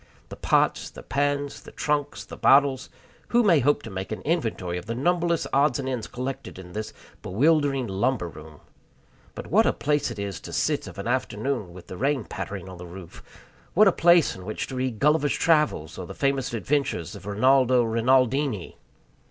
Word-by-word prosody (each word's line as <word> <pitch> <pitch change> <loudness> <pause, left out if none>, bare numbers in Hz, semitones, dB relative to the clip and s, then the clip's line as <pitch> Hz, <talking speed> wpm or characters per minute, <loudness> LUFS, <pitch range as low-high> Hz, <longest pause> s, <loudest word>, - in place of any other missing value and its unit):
The - - -8
pots, - - +1
the - - -12
pans, 145 0 -1
the - - -13
trunks, 145 -1 -2
the - - -9
bottles 135 -1 +3 0.4
who 240 0 +3
may 175 -8 +5
hope 145 +3 +2
to 115 - -8
make 95 +2 -5
an 110 - -4
inventory 115 - -1
of 90 - -13
the 115 - -3
numberless 170 +4 +1
odds 140 -1 +3
and 135 -2 -4
ends 125 -4 -3
collected 130 -3 -6
in 90 -2 -11
this 110 0 -4 0.3
bewildering 140 - +2
lumber 105 0 -1
room? 75 -2 -12 0.7
But - - -7
what - - +3
a - - +2
place 145 -2 0
it 115 - -7
is 100 -2 -4
to - - -10
sit - - 0
of - - -10
an 100 - -5
afternoon 120 -3 -2
with 90 0 -12
the 90 - -9
rain 135 +1 0
pattering 95 -1 -6
on 95 -1 -9
the 90 - -8
roof! 85 -1 -11 0.5
What 210 +3 +7
a - - +6
place 170 -2 +4
in 95 - -10
which 110 +3 -4
to 130 - -6
read 130 -3 -2
Gulliver's 150 +2 +2
Travels, 150 - +1
or - - -6
the - - -9
famous 135 -2 0
adventures 120 - -1
of 95 - -11
Rinaldo 130 +3 +4
Rinaldini! 125 - +1
130 Hz, 190 wpm, -25 LUFS, 100-145 Hz, 0.7 s, What